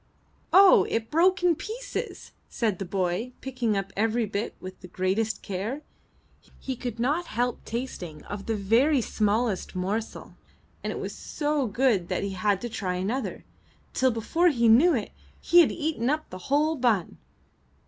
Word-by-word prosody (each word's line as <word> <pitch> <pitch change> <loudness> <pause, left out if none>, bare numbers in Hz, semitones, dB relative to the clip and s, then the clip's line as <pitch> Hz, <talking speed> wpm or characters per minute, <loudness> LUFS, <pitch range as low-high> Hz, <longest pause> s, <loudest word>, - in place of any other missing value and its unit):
"Oh! 390 0 +7
it 225 0 -2
broke 360 +3 +3
in 355 -1 +5
pieces!" 455 +10 -6 0.2
said 215 -6 -1
the 195 - -3
boy, 185 +6 -2
picking 245 -5 -1
up 195 -1 -4
every 225 +2 +1
bit 205 +1 -3
with 185 0 -9
the 180 - -10
greatest 190 +5 -1
care. 210 +10 -4 0.8
He 265 - -4
could 240 -2 -6
not 295 +9 0
help 245 +2 -2
tasting 205 -10 -5
of 205 -1 -7
the 225 - 0
very 235 +9 +3
smallest 215 -3 0
morsel, 200 +5 -3 0.5
and - - -2
it - - -5
was - - -5
so 295 -3 -2
good 215 -5 +1
that - - -1
he 200 - -2
had 195 +1 0
to 240 - -3
try 195 -5 -3
another, 210 +9 -3 0.5
till 260 - +3
before 250 +10 +1
he 235 -6 +2
knew 280 +10 +6
it, 220 - -3 0.3
he 350 - +5
had 340 - +6
eaten 300 -7 -1
up 310 +2 -2
the 185 - -7
whole 300 +3 +2
bun. 235 - 0
230 Hz, 165 wpm, -26 LUFS, 200-275 Hz, 0.8 s, Oh